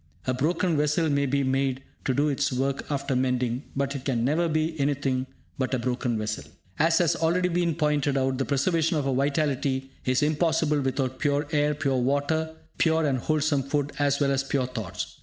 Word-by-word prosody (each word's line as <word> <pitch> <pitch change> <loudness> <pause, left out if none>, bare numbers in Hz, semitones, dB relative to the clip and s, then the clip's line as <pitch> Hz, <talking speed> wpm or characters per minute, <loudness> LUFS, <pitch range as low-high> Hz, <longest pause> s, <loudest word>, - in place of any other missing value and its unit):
A 130 - +1
broken 165 +5 +1
vessel 150 +2 +1
may 140 0 +1
be 140 +1 +1
made 135 0 0 0.2
to 130 - +1
do 145 +2 +2
its 140 -1 0
work 135 +2 -1
after 140 -2 -1
mending, 125 0 0
but 140 0 -1
it 135 - -5
can 120 -4 0
never 165 +5 +1
be 155 +1 0
anything 135 -2 0 0.3
but 130 0 0
a - - +1
broken 125 -1 -1
vessel. 110 0 -3 0.4
As 165 +2 +4
has 175 -4 +3
already 180 +2 +1
been 170 -2 0
pointed 145 -2 +1
out, 130 0 0
the 135 - 0
preservation 160 +4 +1
of 140 -2 -1
our 135 - +1
vitality 135 -1 0
is 130 +2 +1
impossible 155 -1 +2
without 130 -1 -1
pure 145 0 +1
air, 150 -1 +2
pure 135 -2 0
water, 145 +5 0 0.2
pure 160 -1 +3
and 135 -3 +1
wholesome 150 +1 +1
food, 145 +1 -1
as 140 -1 +2
well 140 -1 +2
as 135 0 +1
pure 135 -1 0
thoughts. 110 -8 -6
140 Hz, 195 wpm, -26 LUFS, 130-150 Hz, 0.4 s, As